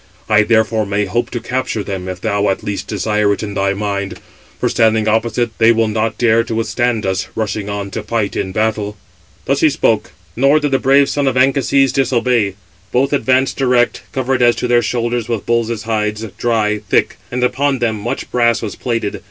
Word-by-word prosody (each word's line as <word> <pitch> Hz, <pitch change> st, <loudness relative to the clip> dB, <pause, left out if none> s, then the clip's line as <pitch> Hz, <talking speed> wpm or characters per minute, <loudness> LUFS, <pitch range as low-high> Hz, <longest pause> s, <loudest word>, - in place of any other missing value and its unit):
I 105 Hz, -1 st, +5 dB
therefore 110 Hz, -1 st, +1 dB
may 100 Hz, +1 st, 0 dB
hope 120 Hz, +5 st, -1 dB
to 120 Hz, -, -4 dB
capture 115 Hz, -2 st, -2 dB
them, 95 Hz, -2 st, -5 dB
if 90 Hz, -1 st, -6 dB
thou, 100 Hz, 0 st, 0 dB
at 95 Hz, -, -2 dB
least, 100 Hz, -1 st, -4 dB
desire 105 Hz, -1 st, 0 dB
it 100 Hz, -, -5 dB
in 100 Hz, -1 st, -5 dB
thy 100 Hz, 0 st, 0 dB
mind; 100 Hz, -1 st, -3 dB, 0.4 s
for -, -, +1 dB
standing 110 Hz, -1 st, +2 dB
opposite, 115 Hz, +1 st, 0 dB
they 115 Hz, 0 st, +6 dB
will 115 Hz, -1 st, +2 dB
not 110 Hz, +1 st, -1 dB
dare 115 Hz, -1 st, +3 dB
to 115 Hz, -1 st, -4 dB
withstand 115 Hz, 0 st, 0 dB
us, 95 Hz, -1 st, -1 dB
rushing 105 Hz, -2 st, -3 dB
on 100 Hz, -1 st, -4 dB
to 110 Hz, -, -4 dB
fight 105 Hz, -1 st, -2 dB
in 95 Hz, -, -2 dB
battle." 105 Hz, 0 st, -1 dB, 0.5 s
Thus -, -, +1 dB
he -, -, +5 dB
spoke; -, -, 0 dB, 0.2 s
nor 140 Hz, +5 st, +4 dB
did 145 Hz, -2 st, -1 dB
the 135 Hz, -, +2 dB
brave 140 Hz, +1 st, +4 dB
son 145 Hz, -1 st, 0 dB
of 130 Hz, -1 st, +1 dB
Anchises 135 Hz, 0 st, +3 dB
disobey. 120 Hz, -6 st, +1 dB, 0.4 s
Both 135 Hz, +3 st, +1 dB
advanced 130 Hz, -1 st, +1 dB
direct, 125 Hz, -3 st, +2 dB
covered 130 Hz, -1 st, -1 dB
as 120 Hz, -1 st, +5 dB
to 125 Hz, -, -2 dB
their 120 Hz, 0 st, +4 dB
shoulders 120 Hz, -1 st, -2 dB
with 115 Hz, -4 st, -2 dB
bulls' 115 Hz, -2 st, 0 dB
hides, 105 Hz, -1 st, -2 dB
dry, 110 Hz, -3 st, 0 dB
thick; -, -, +1 dB
and 125 Hz, 0 st, -2 dB
upon 135 Hz, +2 st, +1 dB
them 115 Hz, -3 st, -1 dB
much 115 Hz, +4 st, -4 dB
brass 120 Hz, -2 st, +2 dB
was 105 Hz, -, -4 dB
plated. 115 Hz, -5 st, -3 dB
115 Hz, 195 wpm, -17 LUFS, 105-125 Hz, 0.5 s, they